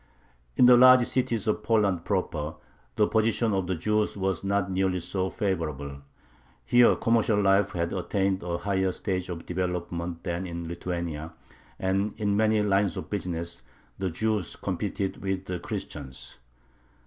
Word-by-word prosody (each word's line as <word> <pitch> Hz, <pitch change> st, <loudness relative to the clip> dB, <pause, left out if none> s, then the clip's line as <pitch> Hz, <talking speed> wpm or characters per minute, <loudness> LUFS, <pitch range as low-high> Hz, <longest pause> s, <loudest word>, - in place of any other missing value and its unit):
In -, -, +7 dB
the 125 Hz, 0 st, +9 dB
large 125 Hz, 0 st, +8 dB
cities 120 Hz, -4 st, -1 dB
of 105 Hz, 0 st, +1 dB
Poland 105 Hz, -6 st, +1 dB
proper 80 Hz, -5 st, -2 dB, 0.4 s
the 105 Hz, -, +4 dB
position 110 Hz, 0 st, +1 dB
of 95 Hz, -2 st, 0 dB
the 95 Hz, -, 0 dB
Jews 105 Hz, +5 st, 0 dB
was 95 Hz, 0 st, -1 dB
not 100 Hz, -1 st, 0 dB
nearly 95 Hz, -1 st, +1 dB
so 95 Hz, +2 st, -2 dB
favorable. 75 Hz, -, -3 dB, 0.7 s
Here 120 Hz, -, +5 dB
commercial 115 Hz, -2 st, +2 dB
life 100 Hz, 0 st, +3 dB
had 85 Hz, -1 st, -1 dB
attained 95 Hz, 0 st, 0 dB
a 85 Hz, -1 st, -2 dB
higher 95 Hz, +1 st, 0 dB
stage 95 Hz, -2 st, -3 dB
of 85 Hz, -2 st, -6 dB
development 90 Hz, -1 st, -3 dB
than 90 Hz, +1 st, -3 dB
in 85 Hz, -1 st, -5 dB
Lithuania, 85 Hz, -2 st, -4 dB, 0.4 s
and 95 Hz, +2 st, 0 dB
in 100 Hz, -1 st, +1 dB
many 110 Hz, 0 st, +3 dB
lines 100 Hz, -1 st, +1 dB
of -, -, -7 dB
business 85 Hz, -6 st, -3 dB, 0.4 s
the 95 Hz, -1 st, -1 dB
Jews 105 Hz, +1 st, -1 dB
competed 95 Hz, -1 st, -3 dB
with 95 Hz, -1 st, -2 dB
the 90 Hz, -1 st, -4 dB
Christians. 65 Hz, -4 st, -7 dB
95 Hz, 150 wpm, -27 LUFS, 85-105 Hz, 0.7 s, the